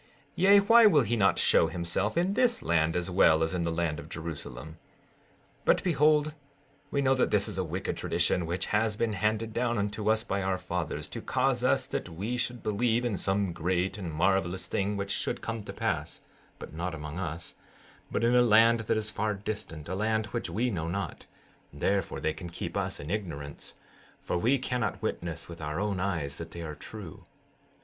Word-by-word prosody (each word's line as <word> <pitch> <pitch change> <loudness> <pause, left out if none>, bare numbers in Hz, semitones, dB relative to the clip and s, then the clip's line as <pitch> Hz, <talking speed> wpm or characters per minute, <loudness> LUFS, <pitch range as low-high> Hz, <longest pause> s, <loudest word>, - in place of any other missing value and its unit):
16:19 - - -30 0.3
Yea, 200 +3 +7
why 230 +3 +7
will 150 -9 +5
he 115 +2 0
not 100 -4 +3
show 80 - +4
himself 90 - -1
in 180 +3 +2
this 245 0 +2
land 80 -1 +2
as 90 0 -1
well 80 -3 +5
as 80 - -1
in 90 - -1
the 85 - 0
land 80 -2 -1
of - - -10
Jerusalem? 80 -2 -7 0.8
16:20 - - -34
But - - +4
behold, 155 -2 +3 0.6
we 140 -1 0
know 135 0 +4
that 130 - +2
this 105 -2 +2
is - - -4
a - - +1
wicked 90 +3 -3
tradition, 85 0 +1
which 85 +3 -1
has 105 0 +2
been 110 0 0
handed 110 +2 0
down 120 0 0
unto 105 +1 -1
us 110 0 +2
by 100 -4 -2
our 95 0 0
fathers, 90 -3 -3
to - - -6
cause - - 0
us - - +2
that - - -4
we 100 +9 -3
should 125 0 -3
believe 115 +3 +1
in 115 -4 0
some 95 -1 0
great 90 +4 -1
and 90 -4 -4
marvelous 90 +2 +1
thing 100 +3 -1
which 100 0 -3
should - - -1
come 115 -1 -4
to - - -6
pass, - - -2 0.4
but - - -9
not 85 +1 -3
among 75 +2 -6
us, 85 -2 -5 0.6
but 115 - -1
in 120 +1 +4
a 125 - +7
land 115 0 +5
which 110 - 0
is 110 0 -2
far 105 0 -1
distant, 95 -7 -6
a 90 - -3
land 110 +2 0
which 120 - -3
we 120 +3 0
know 80 -5 -2
not; 100 +4 -4 0.4
therefore 95 +6 -1
they 80 - 0
can 85 +2 -8
keep 85 - -6
us - - -2
in 75 - -6
ignorance, 80 -9 -5 0.4
for - - -3
we 125 +8 +3
cannot 125 -3 -2
witness 85 -1 -3
with 85 -2 -9
our 75 +2 -3
own 100 -2 -1
eyes 80 -7 -2
that 85 0 -7
they 85 +1 -7
are 80 -2 -5
true. 95 +1 -10
95 Hz, 205 wpm, -29 LUFS, 85-115 Hz, 0.8 s, Yea